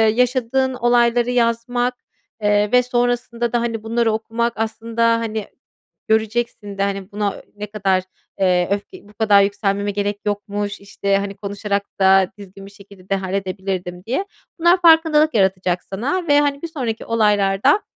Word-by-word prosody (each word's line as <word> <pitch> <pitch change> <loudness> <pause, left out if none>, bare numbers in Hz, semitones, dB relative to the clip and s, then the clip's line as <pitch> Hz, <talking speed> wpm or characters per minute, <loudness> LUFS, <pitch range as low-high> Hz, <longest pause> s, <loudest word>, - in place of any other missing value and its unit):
yaşadığın 255 +1 +1
olayları 240 0 +2
yazmak, 245 +1 0 0.5
eee, 205 0 +2
ve 250 0 +5
sonrasında 240 -1 -1
da, 240 - +2
hani, 225 -2 -3
bunları 230 0 +1
okumak 230 +2 -1
aslında, 225 +1 -2 0.2
hani, 220 -2 -3 0.6
göreceksin 220 -2 -1
de, 195 - +1
hani, 195 0 -3
buna 205 -1 -2
ne 210 - -5
kadar, 195 -3 0 0.4
eee, 180 -2 +2
öfke 205 0 -5
"Bu - - -18
kadar 210 -2 +4
yükselmeme 200 0 0
gerek 205 0 -2
yokmuş, 205 0 -3
işte, 200 0 -1
hani, 200 0 -4
konuşarak 200 0 -3 0.2
da 190 -1 +5
düzgün 195 0 -11
bir 200 - -12
şekilde 200 -2 -17
de 195 - +2
halledebilirdim." 190 -1 -4
diye. 265 - -1 0.3
Bunlar 350 +2 +4
farkındalık 320 -2 +5
yaratacak 185 -3 +1
sana 285 - -3
ve, 290 -1 +5
hani, 285 -1 -1
bir 335 - -4
sonraki 245 -8 -4
olaylarda 210 - +2
215 Hz, 145 wpm, -20 LUFS, 200-240 Hz, 0.6 s, ve